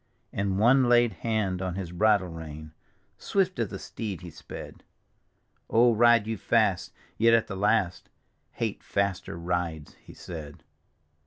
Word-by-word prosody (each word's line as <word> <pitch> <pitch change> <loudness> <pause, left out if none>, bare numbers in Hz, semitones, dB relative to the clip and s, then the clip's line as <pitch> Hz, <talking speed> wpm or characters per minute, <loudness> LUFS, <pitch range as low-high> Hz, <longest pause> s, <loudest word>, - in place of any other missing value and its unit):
And 100 -1 -1
one 125 +4 +4
laid 120 -2 +4
hand 100 -1 -1
on 90 -2 -3
his 95 -3 -5
hridle 95 -2 +2
rein 80 -1 -8 0.2
— - - -41
Swift 190 -7 0
as 115 - +1
the - - -6
steed 95 -1 -6
he 90 -2 -9
sped - - -10 0.3
— - - -45
" - - -44
O, 120 +1 +5
ride 120 -1 +5
you 110 0 -3
fast, 105 -4 +1 0.3
yet 115 +1 +6
at 115 - +2
the 95 - -6
last, 95 -2 0 0.4
Hate - - -3
faster 100 -4 -2
rides," 85 -3 -3
be - - -12
said. 80 -5 -9
100 Hz, 160 wpm, -27 LUFS, 90-115 Hz, 0.4 s, yet